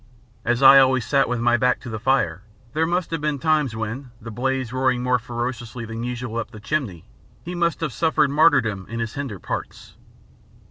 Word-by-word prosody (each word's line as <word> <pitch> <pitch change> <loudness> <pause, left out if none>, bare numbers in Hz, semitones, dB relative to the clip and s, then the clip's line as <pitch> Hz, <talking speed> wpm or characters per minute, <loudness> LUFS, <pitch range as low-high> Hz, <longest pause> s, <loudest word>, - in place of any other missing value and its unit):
As 120 +3 0
I 135 +1 +10
always 130 -3 +3
sat 140 -3 +2
with 120 -1 -1
my 120 0 +3
back 125 +2 +2
to 125 - -8
the 110 - -4
fire 115 -9 +1 0.3
there 160 +1 +1
must 175 0 -1
have 165 -2 -2
been 150 -1 -1
times 150 -5 +1
when, 115 +5 -5
the 115 0 -9
blaze 130 +1 -2
roaring 130 -1 +1
more 125 0 +2
fiercely 120 0 -5
than 115 +1 -6
usual 120 -1 -4
up 115 - -3
the 110 -2 -11
chimney, 110 - -3 0.4
he 175 - -6
must 170 -2 0
have 155 -6 -2
suffered 160 -4 +2
martyrdom 135 - +3
in 115 +1 -4
his 115 -1 -3
hinder 135 -8 -5
parts. - - -7
125 Hz, 195 wpm, -22 LUFS, 115-140 Hz, 0.4 s, I